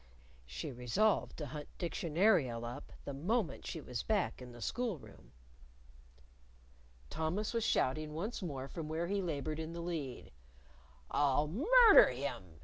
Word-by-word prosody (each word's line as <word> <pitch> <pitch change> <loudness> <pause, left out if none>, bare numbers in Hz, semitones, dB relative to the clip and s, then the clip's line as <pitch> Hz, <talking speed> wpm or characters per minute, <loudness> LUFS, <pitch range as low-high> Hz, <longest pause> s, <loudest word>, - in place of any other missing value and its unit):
(She - - -5
resolved 130 - +1
to 150 - -4
hunt 150 +2 -7
Dictionarial 165 - +1
up 120 +1 -7
the 140 - -4
moment 180 - -1
she 165 - -4
was 125 -5 -4
back 205 -10 0
in 125 -1 -9
the 120 - -12
school 230 - -2
room.) - - -15 1.8
Thomas 175 +8 -1
was 230 -1 0
shouting 150 -4 0
once 210 +9 -3
more 140 -7 -4
from 155 +3 -6
where 160 +2 -1
he 200 +3 -1
labored 155 -3 -3
in 160 +1 -5
the 170 - -6
lead. 155 - -5 0.8
"I'll 145 +1 +2
murder 420 - +7
him!" 110 - -5
155 Hz, 145 wpm, -34 LUFS, 135-195 Hz, 1.8 s, murder